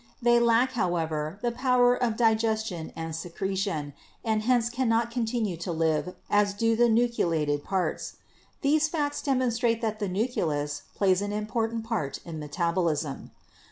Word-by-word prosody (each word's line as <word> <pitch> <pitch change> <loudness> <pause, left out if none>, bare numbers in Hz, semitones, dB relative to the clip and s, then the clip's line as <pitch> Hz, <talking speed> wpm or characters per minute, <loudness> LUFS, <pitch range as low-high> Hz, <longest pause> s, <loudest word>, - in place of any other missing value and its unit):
They 240 0 +4
lack, 235 +2 +3
however, 165 -6 -1
the 240 - +1
power 250 0 +3
of 240 -3 0
digestion 220 -6 +1
and 165 -1 -4
secretion 175 -3 -3 0.3
and 220 -1 +1
hence 240 0 +2
cannot 235 -2 +1
continue 225 -6 -1
to 170 +2 -4
live 160 +2 0
as 205 -1 +2
do 225 +2 +2
the 240 +1 +4
nucleated 165 -11 +1
parts. 190 -2 -2 0.5
These 305 +2 +3
facts 295 -3 -2
demonstrate 240 -4 +1
that 215 -1 -1
the 205 -3 -1
nucleus 160 - -1
plays 190 -1 +3
an 205 0 -2
important 225 +2 -2
part 220 - -2
in 165 -2 -6
metabolism. 160 -1 -1
215 Hz, 140 wpm, -27 LUFS, 170-235 Hz, 0.5 s, They